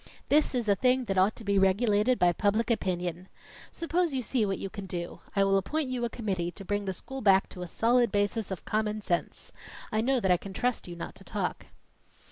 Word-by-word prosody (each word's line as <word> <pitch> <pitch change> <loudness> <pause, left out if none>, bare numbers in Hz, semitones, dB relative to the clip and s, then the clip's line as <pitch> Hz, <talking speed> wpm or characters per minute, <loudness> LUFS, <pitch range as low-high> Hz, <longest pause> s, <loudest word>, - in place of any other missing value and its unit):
This 295 -2 +3
is 240 -3 -1
a 205 - +5
thing 250 +5 +2
that 195 -3 -2
ought 195 +4 +3
to 230 - -9
be 200 -1 +2
regulated 210 +5 +3
by 175 -1 +4
public 215 +6 +1
opinion. 180 -4 -2 0.4
Suppose 335 -2 0
you 255 - -1
see 225 -2 0
what 195 - -1
you - - -4
can 195 0 -8
do 175 -2 -5 0.2
I 195 - +4
will 195 0 +3
appoint 295 +8 -2
you 250 -1 -2
a - - -2
committee 190 -8 -2
to 195 - -9
bring 205 +1 -1
the 190 - -2
school 270 +8 -7
back 195 -2 +5
to 180 - -9
a 180 - -4
solid 235 +4 +2
basis 205 +1 0
of 190 - -6
common 215 0 -1
sense. 175 -4 -3 0.4
I 215 - +1
know 260 +2 +2
that 190 -5 +1
I 180 - +5
can 195 +2 -9
trust 250 +1 -1
you 175 - -7
not 170 - -6
to - - -12
talk." - - -3
205 Hz, 230 wpm, -29 LUFS, 190-240 Hz, 0.4 s, a